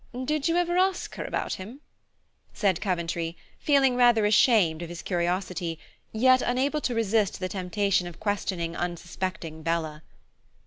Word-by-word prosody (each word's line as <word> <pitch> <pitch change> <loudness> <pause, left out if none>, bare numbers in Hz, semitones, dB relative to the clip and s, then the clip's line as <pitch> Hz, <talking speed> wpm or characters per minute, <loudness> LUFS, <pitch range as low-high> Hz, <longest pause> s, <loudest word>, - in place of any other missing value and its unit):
Did 300 +1 0
you 335 +1 +2
ever 350 0 +1
ask 375 -1 0
her - - -5
about - - -2
him?" 215 +9 -8 0.8
said 195 -5 +1
Coventry, 170 -3 -2 0.2
feeling 275 -3 +3
rather 240 -3 +4
ashamed 205 -6 +4
of 170 - -6
his 175 0 -8
curiosity, 175 -1 -2 0.3
yet 255 +3 +4
unable 275 +5 0
to 245 - -1
resist 220 -2 +1
the 185 - -2
temptation 185 0 0
of 175 - -10
questioning 185 -5 -2
unsuspecting 175 -2 -4
Bella. 160 -2 -2
195 Hz, 140 wpm, -26 LUFS, 170-245 Hz, 0.8 s, rather